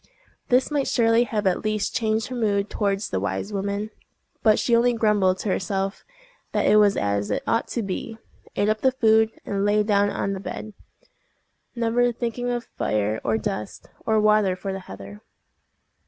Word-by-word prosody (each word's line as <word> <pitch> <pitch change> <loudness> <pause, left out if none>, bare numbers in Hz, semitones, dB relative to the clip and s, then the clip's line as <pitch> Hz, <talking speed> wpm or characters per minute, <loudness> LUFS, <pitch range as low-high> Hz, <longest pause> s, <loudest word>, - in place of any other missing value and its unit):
This 255 +4 +3
might 285 -2 0
surely 230 0 +3
have 210 -2 -2
at 185 -2 +1
least 215 -1 -1
changed 220 -2 0
her 255 - -5
mood 205 -3 0
towards 200 -1 -1
the 95 - 0
wise 100 - -3
woman; 200 +2 -2 0.5
but 215 -2 +4
she 235 - +2
only 240 +1 +3
grumbled 210 -5 +2
to 205 - -3
herself 195 +1 -2 0.5
that - - +1
it 210 - +5
was 205 -1 +4
as 100 0 -1
it - - -1
ought 230 - 0
to 235 - -3
be, 205 +3 -5 0.4
ate 205 - +1
up 215 0 0
the 260 - +4
food, 220 -3 +3 0.2
and 200 -1 -1
lay 210 +1 +3
down 205 -1 +2
on 195 - -2
the 190 - -4
bed, 210 +2 -7 1.0
never 240 +1 +2
thinking 240 +1 -3
of 240 -1 -2
fire, 105 +1 -1
or 110 -1 +1
dust, 105 -1 -5
or 220 -1 +2
water 210 -3 +3
for 195 +1 -5
the 190 - -4
heather. 100 - -11
210 Hz, 180 wpm, -24 LUFS, 195-230 Hz, 1.0 s, it